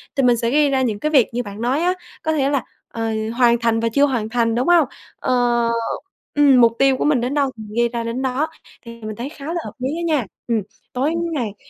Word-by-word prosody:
thì 270 - +2
mình 245 -1 +4
sẽ 230 0 0
ghi 290 +1 +4
ra 265 -1 +1
những 215 -5 -1
cái 305 - 0
việc 265 -6 +5
như 245 +1 -1
bạn 205 +1 -8
nói 255 +5 +1
á, 360 +1 +2 0.3
có 315 - +1
thể 275 -2 +1
là, 280 -4 0 0.2
ờ, 225 -1 -3 0.3
hoàn 240 -1 +5
thành 230 -1 +1
và 230 - 0
chưa 280 - +5
hoàn 240 -6 -1
thành, 230 -1 +1
đúng 250 +3 0
hông? 340 -6 +5 0.3
Ờ 240 -2 +1 0.7
ừm, 275 -4 +6
mục 230 -1 +6
tiêu 270 -1 +4
của - - -1
mình 295 -5 +3
đến 250 +3 -1
đâu 280 -2 +2
thì 220 - -8
mình 210 0 -10
ghi 235 0 +3
ra 235 -1 -3
đến 230 +3 -3
đó. 265 +4 0 0.4
Thì 230 0 -10
mình 215 0 -5
thấy 240 +6 -5
khá 285 -2 -11
là 335 +1 -2
hợp - - -6
lý 255 +1 -1
á 340 - -3
nha. 295 -7 +1 0.2
Ừm, 230 -3 +1 0.3
tối 275 +6 0 0.2
ngày 230 -8 -3
250 Hz, 255 wpm, -20 LUFS, 230-280 Hz, 0.7 s, ừm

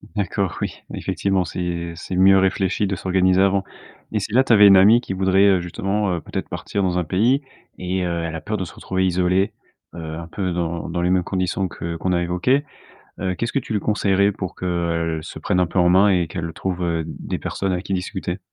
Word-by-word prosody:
D'accord, 100 -2 -1
oui. - - -2 0.2
Effectivement, 95 -2 -1
c'est 85 0 -4
c'est 85 +2 -6
mieux 95 +1 +6
réfléchi 95 +1 +1
de 95 0 -1
s'organiser 95 0 +2
avant, 100 0 +2 0.5
mais - - 0
si - - -5
là, 130 +2 +5
tu 120 - +3
avais 105 -1 +8
une 95 - +8
amie 110 +6 +6
qui 95 - -5
voudrait, 95 +1 +3
heu, 95 -2 +4
justement, 95 +3 -1
heu, 85 - -4
peut-être - - -5
partir 100 - -3
dans 90 -1 0
un - - 0
pays, 115 - +2 0.4
et 90 +1 -2
heu, 85 -1 -2
elle 80 -1 -4
a 80 - -5
peur 105 +7 -3
de 95 - -3
se 85 - -11
retrouver 95 0 -2
isolée, 90 +2 +1 0.4
heu, 80 -2 -6
un 85 0 -7
peu 90 +2 -3
dans 85 -1 -3
dans 85 +1 -2
les 90 - +1
mêmes 90 -1 +2
conditions 95 +1 -1
que 85 -1 -6
qu'on 90 +3 -2
a 85 - +1
évoquées, 90 +12 +1 0.6
heu, 95 -1 -1
qu'est-ce 115 +6 -3
que - - +1
tu 115 - -7
lui 105 - +1
conseillerais 100 -1 +2
pour 95 -2 -6
qu'elle, 85 -2 -1
se - - -8
prenne 90 - 0
un 90 - +3
peu 85 - -3
en 90 -1 +5
main, 95 +3 +5
et 90 -3 +2
qu'elle 80 0 -5
trouve, 90 +1 -3
heu, 85 -2 -1
des - - -5
personnes 95 -1 -2
avec 90 +1 -2
qui 95 - -4
discuter? 90 -1 -3
95 Hz, 230 wpm, -21 LUFS, 85-95 Hz, 0.6 s, avais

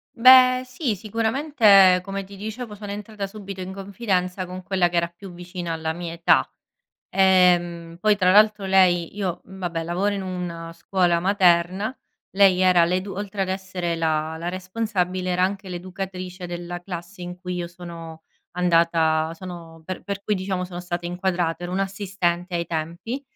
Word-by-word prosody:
Beh, 255 +1 +7
sì 255 -3 -2
sicuramente 220 - +4
come 195 0 -4
ti 200 +1 -12
dicevo 215 +2 -6
sono 205 -1 -7
entrata 210 0 -5
subito 195 -2 -8
in 185 +1 -6
confidenza 190 -2 -2
con 185 +1 -7
quella 185 -1 +1
che 175 0 -2
era 170 0 +2
più 180 +2 -12
vicina 175 -1 -6
alla 160 0 -2
mia 170 0 -6
età. 170 0 +3 0.6
Ehm, 175 -3 +3
poi 210 +1 +3
tra 185 -2 +3
l’altro 210 0 +5
lei 185 -3 +3
io 185 -4 -2
vabbè 175 -4 -5
lavoro 185 +5 0
in 195 - -3
una 175 -3 -5
scuola 175 0 +1
materna, 185 +3 +2 0.4
lei 190 -2 +4
era 180 -2 +5
l'edu 185 +3 -1
oltre 200 +1 -4
ad 190 - -1
essere 185 -3 -3
la 160 0 -1
la 170 +1 -5
responsabile 185 -1 -2
era 180 +1 +2
anche 195 0 -2
l’educatrice 185 0 -6
della 175 0 -5
classe 180 +1 -8
in 180 0 -7
cui 180 0 -5
io 175 -1 -3
sono 170 -2 -10 0.3
andata 165 -2 +2
sono 165 -2 -10
per 185 +2 -6
per 200 0 -5
cui 210 - 0
diciamo 185 -1 -2
sono 180 -1 -7
stata 175 -1 -4
inquadrata. 175 -1 -1
Ero 175 +1 -4
un’assistente 190 -2 -1
ai 170 0 -1
tempi, 170 - -4
185 Hz, 160 wpm, -23 LUFS, 175-195 Hz, 0.6 s, Beh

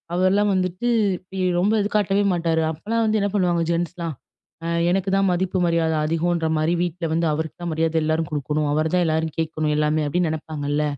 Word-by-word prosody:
அவர்லாம் 195 +3 +3
வந்துட்டு 185 +4 -1 0.5
இ - - -2 0.2
ரொம்ப 200 +4 +2
இது 205 - -1
காட்டவே 205 -1 +2
மாட்டாரு. 165 -2 +1
அப்பல்லாம் 220 +9 -2
வந்து 215 0 +2
என்ன 200 - +1
பண்ணுவாங்க, 175 -3 +2
ஜென்ட்ஸ்லாம் 170 -2 -2 0.5
அ - - -2 0.2
எனக்கு 195 +1 0
தான் 195 -1 +2
மதிப்பு 185 +1 0
மரியாதை 165 -1 +1
அதிகம்ன்ற 165 +1 0
மாரி 155 +2 +1
வீட்ல 175 0 -2
வந்து 165 +1 +1
அவருக்கு 160 +1 -4
தான் 170 - -2
மரியாதை 160 +1 0
எல்லாரும் 160 0 0
கொடுக்கணும். 150 +1 -1
அவரு 155 +1 0
தான், 180 -1 +3
எல்லாரும் 160 0 -1
கேட்கணும் 155 -1 -1
எல்லாமே 150 0 +1
அப்பிடின்னு 170 +2 0
நினைப்பாங்கல்ல. 150 -1 -2
165 Hz, 180 wpm, -22 LUFS, 155-185 Hz, 0.5 s, அவர்லாம்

